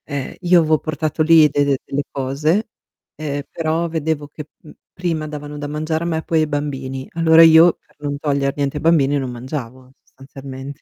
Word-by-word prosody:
Eh, 140 -3 -5
io 175 -1 +5
avevo 155 -1 +2
portato 155 0 -3
lì 160 -1 +6
de 145 0 +1
de 140 -1 +1
delle 140 +1 -2
cose, 150 - -1 0.5
ehm, 145 -2 -4
però 165 +1 -1
vedevo 160 -2 -2
che, 150 +1 -10 0.2
uhm, 155 - -13 0.2
prima 165 -4 -3
davano 150 -1 -7
da 145 0 -5
mangiare 155 +2 -2
a - - -2
me 160 -1 -2
poi 165 - +1
ai 155 - +1
bambini. 135 -3 -4
Allora 165 0 +6
io 165 +1 +7
per - - -33
non 145 -1 -4
toglier 140 -2 -1
niente 140 0 -2
ai - - -5
bambini, 145 -4 +3
non 130 -2 -3
mangiavo 130 0 -7
sostanzialmente. 135 +1 -10
150 Hz, 190 wpm, -19 LUFS, 140-160 Hz, 0.5 s, io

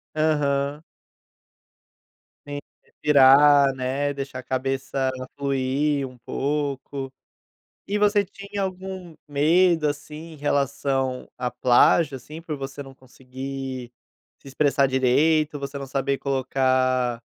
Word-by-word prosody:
Aham. 145 -2 0 1.6
Tem 145 0 -5
que - - -38
respirar, 140 -1 +6
né, 135 +2 -1
eixar 135 -2 -6
a - - -14
cabeça 135 +1 -2 0.3
fluir 140 +1 0
um 125 - -15
pouco. 140 0 -3 0.8
E 205 - 0
você 205 0 +3
tinha 200 +1 -7
algum 185 -3 -5
medo, 160 +2 +3
assim, 150 +3 -6
em - - -11
relação 140 -2 -1
à 125 - -2
plágio, 135 +5 +3
assim, 150 +6 -10
por 165 -2 -5
você 135 +1 -6
não 135 -1 -12
conseguir 130 0 -7 0.5
se - - -16
expressar 140 0 +2
direito, 145 +4 +2
você 140 0 -5
não 140 -1 -6
saber 135 0 -1
colocar 130 -2 +1
140 Hz, 115 wpm, -24 LUFS, 130-150 Hz, 1.6 s, respirar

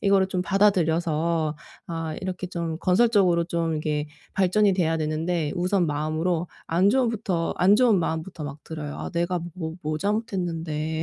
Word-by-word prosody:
이거를 195 -1 +4
좀 185 -1 -1
받아들여서 170 -5 +2 0.3
아 165 -2 -4
이렇게 185 -1 -4
좀 170 -2 -4
건설적으로 185 -3 +3
좀 165 -1 -1
이게 150 -1 -1 0.3
발전이 195 +2 +3
돼야 165 -3 +1
되는데 155 0 -1
우선 180 0 +1
마음으로 155 +3 -1 0.2
안 175 +4 +3
좋은 245 +1 +3
부터 190 -7 -1
안 195 +3 +6
좋은 230 -4 +4
마음부터 160 0 -3
막 145 0 -8
들어요. 150 -2 -6
'아 - - -5
내가 175 +1 0 0.2
뭐 160 -3 -5
뭐 155 0 -2
잘못했는데?' 165 -6 -2
170 Hz, 340 characters per minute, -25 LUFS, 160-190 Hz, 0.3 s, 안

